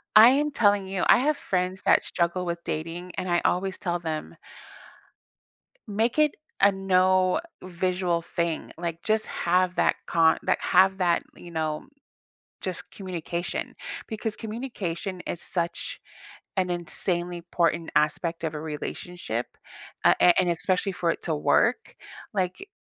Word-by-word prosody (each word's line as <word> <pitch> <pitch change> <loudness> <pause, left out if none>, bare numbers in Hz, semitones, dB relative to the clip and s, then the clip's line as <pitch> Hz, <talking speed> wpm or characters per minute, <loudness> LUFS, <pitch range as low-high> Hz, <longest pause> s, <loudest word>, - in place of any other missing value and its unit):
I 220 +3 +11
am 295 +2 +2
telling 205 -6 +3
you, 190 -2 -1
I - - +8
have 295 +3 +1
friends 185 +1 -2
that - - +5
struggle 175 +1 -1
with 170 0 -3
dating, 170 +3 -4
and 185 -1 -2
I 175 - +2
always 190 +1 +1
tell 175 -3 -1
them 160 -2 -4 1.5
"Make 225 +6 0
it 300 -1 +4 0.3
a 200 - +7
no 185 -1 +3 0.2
visual 180 -1 0
thing," 170 -1 -2
like, 170 -1 -4
just 220 0 +1
have 180 +1 +1
that - - +3
con 165 -1 +4
that - - +1
have 190 +1 +4
that, 175 -2 +2
you 175 - -11
know, 155 - -2 0.7
just 185 -2 -5
communication 175 -2 -4 0.3
because 220 -1 -4
communication 210 -6 -4
is 170 - -4
such 170 -1 -3 0.6
an 185 -1 +1
insanely 175 0 -2
important 170 -1 +1
aspect 165 +2 +1
of 160 - -1
a 150 - -4
relationship 150 -4 -5 0.5
a - - +7
a 175 0 +6
and 180 -2 +2
especially 185 +3 0
for 175 -1 -1
it - - -6
to 160 -3 0
work, 430 - +2 0.4
like 195 - -2
180 Hz, 140 wpm, -26 LUFS, 170-195 Hz, 1.5 s, I